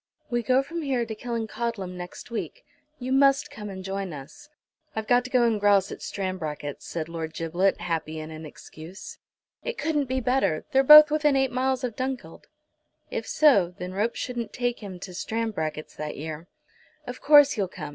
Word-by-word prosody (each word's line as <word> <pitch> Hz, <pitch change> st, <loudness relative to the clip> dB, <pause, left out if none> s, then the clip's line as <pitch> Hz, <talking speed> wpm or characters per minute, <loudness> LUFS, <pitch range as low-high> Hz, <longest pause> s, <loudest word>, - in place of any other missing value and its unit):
"We 240 Hz, 0 st, +1 dB
go 255 Hz, +4 st, +2 dB
from 335 Hz, +4 st, -5 dB
here 260 Hz, -5 st, 0 dB
to 220 Hz, -, -5 dB
Killancodlem 230 Hz, -4 st, -4 dB
next 180 Hz, +6 st, -9 dB
week. -, -, -5 dB, 0.3 s
You 255 Hz, 0 st, -5 dB
must 275 Hz, +1 st, +4 dB
come 210 Hz, -1 st, -7 dB
and 190 Hz, -1 st, -7 dB
join 195 Hz, -2 st, -4 dB
us." 145 Hz, -, -11 dB, 0.5 s
"I've 220 Hz, 0 st, -2 dB
got 245 Hz, +2 st, +3 dB
to -, -, -6 dB
go 250 Hz, -2 st, +3 dB
and 230 Hz, -3 st, +2 dB
grouse 200 Hz, -1 st, +4 dB
at -, -, -8 dB
Stranbracket's," 160 Hz, -7 st, -4 dB
said 160 Hz, -2 st, -4 dB
Lord 160 Hz, -1 st, -6 dB
Giblet, 175 Hz, +4 st, 0 dB
happy 160 Hz, -2 st, -3 dB
in 155 Hz, 0 st, -7 dB
an 155 Hz, 0 st, -8 dB
excuse. 160 Hz, +4 st, -11 dB, 0.4 s
"It 485 Hz, -2 st, -4 dB
couldn't 300 Hz, -3 st, 0 dB
be 260 Hz, 0 st, -1 dB
better. 235 Hz, -10 st, +1 dB
They're 270 Hz, -, +5 dB
both 300 Hz, +2 st, +10 dB
within 300 Hz, -2 st, +3 dB
eight 265 Hz, -1 st, +2 dB
miles 260 Hz, +1 st, 0 dB
of 240 Hz, -3 st, -3 dB
Dunkeld." 260 Hz, -1 st, -5 dB, 0.6 s
If -, -, -3 dB
so, 200 Hz, -, +4 dB
then 180 Hz, +1 st, -6 dB
ropes 210 Hz, +4 st, -1 dB
shouldn't 240 Hz, -3 st, -4 dB
take 245 Hz, -1 st, -1 dB
him 195 Hz, -4 st, -8 dB
to 185 Hz, -, -8 dB
Stranbracket's 180 Hz, -8 st, -3 dB
that 150 Hz, 0 st, -5 dB
year. 155 Hz, +2 st, -6 dB, 0.6 s
"Of 250 Hz, 0 st, -7 dB
course 290 Hz, -1 st, +7 dB
you'll 200 Hz, -3 st, 0 dB
come. 155 Hz, -4 st, -8 dB
220 Hz, 185 wpm, -26 LUFS, 175-260 Hz, 0.6 s, both